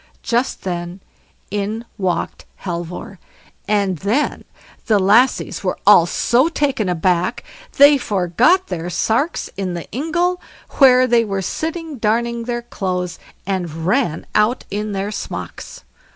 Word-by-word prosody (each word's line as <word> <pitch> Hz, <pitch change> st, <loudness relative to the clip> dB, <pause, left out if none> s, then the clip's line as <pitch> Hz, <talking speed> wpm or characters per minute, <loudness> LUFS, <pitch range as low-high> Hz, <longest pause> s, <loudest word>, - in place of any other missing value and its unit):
Just 240 Hz, +2 st, -1 dB
then 175 Hz, 0 st, -4 dB, 0.5 s
in 210 Hz, +3 st, -3 dB
walked 185 Hz, -3 st, -2 dB, 0.2 s
Halvor, 175 Hz, +1 st, -5 dB, 0.5 s
and 200 Hz, -5 st, +1 dB
then 225 Hz, -, -1 dB, 0.4 s
the 215 Hz, -3 st, +4 dB
lassies 210 Hz, +7 st, +3 dB
were 185 Hz, -, -1 dB
all 185 Hz, -4 st, +7 dB
so 245 Hz, -, +2 dB
taken 270 Hz, -, 0 dB
aback, 180 Hz, +4 st, 0 dB, 0.3 s
they 285 Hz, 0 st, +7 dB
forgot 205 Hz, -, +2 dB
their 175 Hz, -1 st, -4 dB
sarks 230 Hz, -, 0 dB
in 185 Hz, -3 st, -3 dB
the 170 Hz, -, -6 dB
ingle, 345 Hz, +6 st, -1 dB, 0.4 s
where 255 Hz, -2 st, +7 dB
they 240 Hz, -2 st, +3 dB
were 195 Hz, -3 st, -3 dB
sitting 320 Hz, -, -4 dB
darning 235 Hz, +2 st, 0 dB
their 240 Hz, 0 st, -3 dB
clothes, 180 Hz, -6 st, -3 dB, 0.3 s
and 175 Hz, -4 st, -3 dB
ran 190 Hz, -, 0 dB
out 215 Hz, +4 st, +2 dB
in 210 Hz, +1 st, -3 dB
their 195 Hz, +1 st, -2 dB
smocks. -, -, -7 dB
210 Hz, 125 wpm, -19 LUFS, 180-250 Hz, 0.5 s, all